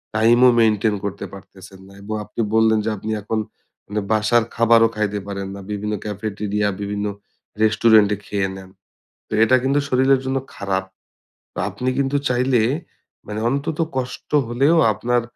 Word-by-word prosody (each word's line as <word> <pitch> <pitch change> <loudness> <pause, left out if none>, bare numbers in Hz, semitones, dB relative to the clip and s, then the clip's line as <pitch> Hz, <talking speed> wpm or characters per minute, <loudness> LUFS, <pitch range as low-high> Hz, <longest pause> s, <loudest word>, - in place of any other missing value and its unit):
টাইমও 120 +3 +5
মেইনটেইন 110 -1 +3
করতে 100 0 -4
পারতেছেন 95 0 -13
না। 100 - -16
এবং 110 +2 -5
আপনি 105 +3 -5
বললেন 110 0 +4
যে - - +1
আপনি 110 +3 -5
এখন 110 +2 -2 0.5
মানে 105 +1 -2
বাসার 110 +2 +3
খাবারও 115 0 +5
খাইতে 105 -1 -1
পারেন 100 -1 -4
না। - - -8
বিভিন্ন 105 +1 -3
cafeteria, 105 0 -2
বিভিন্ন 100 +1 -3 0.6
রেস্টুরেন্টে 110 -1 +4
খেয়ে 100 -2 -1
নেন। 95 -1 -11 0.6
তো - - -16
এটা 130 +3 +4
কিন্তু 140 +2 +2
শরীরের 130 0 +3
জন্য 130 0 0 0.2
খারাপ। 95 -1 -2 0.7
তো - - -14
আপনি 125 - -3
কিন্তু 140 +1 +1
চাইলে 125 -1 +2 0.7
মানে 105 +1 -4
অন্তত 145 +4 -2 0.2
কষ্ট 125 -1 -5 0.2
হলেও 135 +7 +2 0.2
আপনার 120 +4 0
110 Hz, 150 wpm, -21 LUFS, 105-125 Hz, 0.7 s, টাইমও